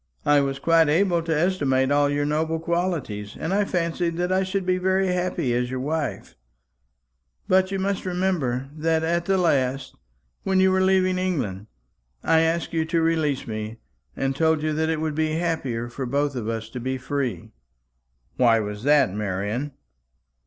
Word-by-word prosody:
I 145 -1 +5
was 135 -1 -1
quite 165 +1 +3
able 170 +2 +2
to 160 -2 -1
estimate 140 -7 +1
all 145 0 +3
your 145 0 0
noble 160 +2 0
qualities, 165 - -2
and 165 - -2
I 205 +1 +2
fancied 170 -2 -1
that 180 +1 -1
I 185 0 +3
should 190 0 -2
be 185 0 +1
very 190 +1 +1
happy 180 -7 -1
as 125 0 0
your 130 0 -3
wife. 145 -6 -3 1.1
But 185 0 +3
you 195 - -2
must 195 0 -1
remember 175 -9 -1
that 160 +1 0
at 170 +1 0
the 195 +1 +2
last, 135 -6 0 0.5
when 190 -1 +1
you 190 0 +4
were 190 0 +2
leaving 185 -1 +2
England, 110 - -2 0.6
I 160 - +4
asked 165 +1 0
you 160 -1 +1
to 165 +1 0
release 160 -4 0
me, 110 0 -5 0.4
and 135 0 -1
told 160 0 +2
you 155 0 0
that 160 +1 0
it 160 -1 0
would 160 -1 -1
be 155 +1 0
happier 155 -8 -2
for 125 +2 -5
both 140 +2 0
of 115 -3 -3
us 110 -1 -3
to 125 - -6
be 130 +2 -2
free." 130 -4 -3 0.9
"Why 115 -3 +4
was 105 -1 -4
that, 145 -10 +4
Marian?" 105 +7 -3
155 Hz, 175 wpm, -24 LUFS, 130-175 Hz, 1.1 s, I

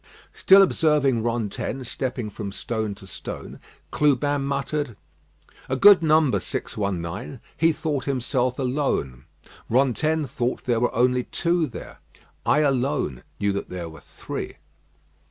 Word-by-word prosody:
Still 195 +1 +7
observing 150 -9 +2
Rantaine 120 +3 -2
stepping 125 -2 -4
from 100 -1 -6
stone 110 0 -3
to 100 - -13
stone, 95 - -8 0.3
Clubin 145 0 +2
muttered: 140 -3 -2 0.7
"A 130 - +1
good 200 +6 +8
number 155 -3 +3
619. 100 +5 -4 0.2
He 165 +1 +3
thought 150 -4 -2
himself 130 -1 0
alone. 125 - -1 0.4
Rantaine 140 +5 +2
thought 120 0 -2
there 120 -2 +1
were 120 - 0
only 125 +1 +2
two 170 -1 0
there. - - -10 0.5
I 150 - +4
alone 135 - 0 0.2
knew 100 0 +1
that 100 - -4
there 90 -2 -5
were 80 -2 -13
three." - - -7
130 Hz, 125 wpm, -24 LUFS, 110-145 Hz, 0.7 s, good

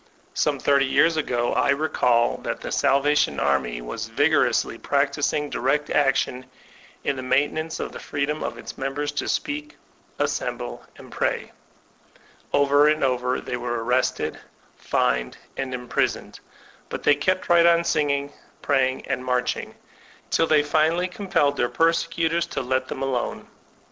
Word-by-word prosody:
Some - - +1
thirty 140 -1 +3
years 165 +5 +3
ago 120 -6 0
I - - +2
recall 125 -5 +2
that - - -4
the - - -5
Salvation 140 - +2
Army 70 -4 0
was 110 - -5
vigorously 125 -2 +2
practbing 145 +1 0
direct 145 +4 0
action 135 -2 +1 0.6
in 140 - -1
the - - -4
maintenance 145 +5 0
of - - -4
the - - -8
freedom 145 +1 -2
of - - -4
its - - -9
members 145 +2 -2
to 145 - -3
qieak, 300 +1 -3 0.4
assemble, - - -3
and - - -13
pray. - - -2 1.0
Over 145 +1 +4
and 155 0 +2
over 125 -1 0
they 125 - -4
were 120 -1 -3
arrested, 125 +2 0 0.4
fined, 60 0 0 0.2
and 135 -1 -3
imprisoned; 125 -1 -2 0.5
but - - -5
they 145 - +6
kept 185 +6 0
right 170 0 +5
on 170 0 +5
tioging, 145 -4 0 0.3
praying, 130 -2 +1
and 130 -1 -2
marching, 125 -1 -1 0.6
till 165 - +3
they 150 -2 +4
finally 160 +4 +2
com 195 +2 -8
pelled 145 -6 +2
their 120 - +1
persecutors 165 0 +1
to - - -3
let 130 +1 -1
them 135 - -5
alone. 130 -3 -2
140 Hz, 145 wpm, -24 LUFS, 125-155 Hz, 1.0 s, they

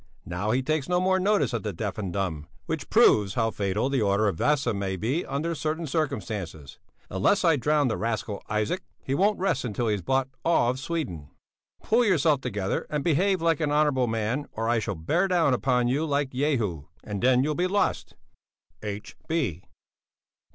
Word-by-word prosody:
Now 90 +4 -3
he 125 +3 +1
takes 155 +1 -1
no 180 0 +3
more 190 +1 +2
notice 200 -6 +2
of 115 - -1
the 105 - -3
deaf 105 +4 -4
and 95 -4 -3
dumb, 85 -6 -3 0.2
which - - -4
proves 100 -2 +4
how 115 -2 +1
fatal 100 +4 -1
the 135 -3 0
order 100 +1 +2
of 100 - 0
Vasa 140 - +1
may 100 -1 -2
be 125 - -1
under 150 +5 -2
certain 160 +1 -2
circumstances. 110 - -3 0.3
Unless 140 - +2
I 165 -2 +5
drown 150 +1 +2
the 110 - -1
rascal 110 -2 -2
Isaac, 110 - -1 0.2
he 135 - -2
won't 200 +8 +2
rest 170 -7 0
until 120 -1 -1
he - - +2
has 100 - -2
bought 130 +8 +1 0.2
all 130 -7 +3
Sweden. 130 - -4 0.5
Pull 235 +3 +3
yourself 160 - +3
together 100 -5 -2
and 150 -2 -2
behave 180 +2 +2
like 165 -3 +2
an 150 -2 0
honourable 145 -4 +2
man, 115 +5 -1
or 115 +1 -2
I 120 0 +2
shall 100 -2 -3
bear 160 - +1
down 170 -7 +3
upon 125 -1 +1
you 135 +5 +1
like 140 -3 0
Jehu, 120 - -1 0.2
and 100 -2 -5
then 130 0 +4
you'll 150 +2 0
be 180 +4 0
lost. 200 +2 -1 0.7
H. 105 0 -6
130 Hz, 185 wpm, -26 LUFS, 105-155 Hz, 0.7 s, I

